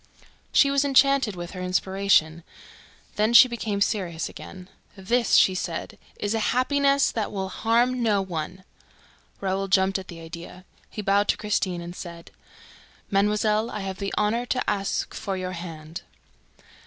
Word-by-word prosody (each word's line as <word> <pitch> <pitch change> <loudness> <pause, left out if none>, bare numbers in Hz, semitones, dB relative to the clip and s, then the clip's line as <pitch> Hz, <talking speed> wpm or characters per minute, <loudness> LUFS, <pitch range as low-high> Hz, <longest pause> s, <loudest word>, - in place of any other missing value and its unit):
She 280 - +4
was 280 0 +2
enchanted 275 -5 +3
with 175 0 -7
her 185 - -7
inspiration. 180 -3 +1 0.7
Then 215 +2 +2
she 255 - +10
became 220 -4 -3
serious 185 -6 -1
again. 185 -1 -11 0.3
"This," 230 +4 +1
she 190 - +6
said, 185 - -5 0.2
"IS 205 +1 -1
A 225 - 0
HAPPINESS 275 +4 +2
THAT 220 -3 -3
WILL 190 -2 -3
HARM 240 +5 +1
NO 210 -4 +2
ONE." 180 +1 -5 0.8
Raoul 195 0 -1
jumped 190 0 +2
at 190 - -10
the 170 -2 -9
idea. 170 +2 -10 0.2
He 210 - -6
bowed 200 +1 +2
to - - +1
Christine 190 -4 -1
and 175 +1 -8
said: 170 -2 -9 0.8
"Mademoiselle, 210 +2 +2
I 210 - -5
have 190 -1 -5
the 200 0 -3
honor 230 +4 0
to 255 - -1
ask 200 -1 -1
for 195 -1 -4
your 185 0 -4
hand." 165 -2 -8
195 Hz, 155 wpm, -25 LUFS, 185-225 Hz, 0.8 s, she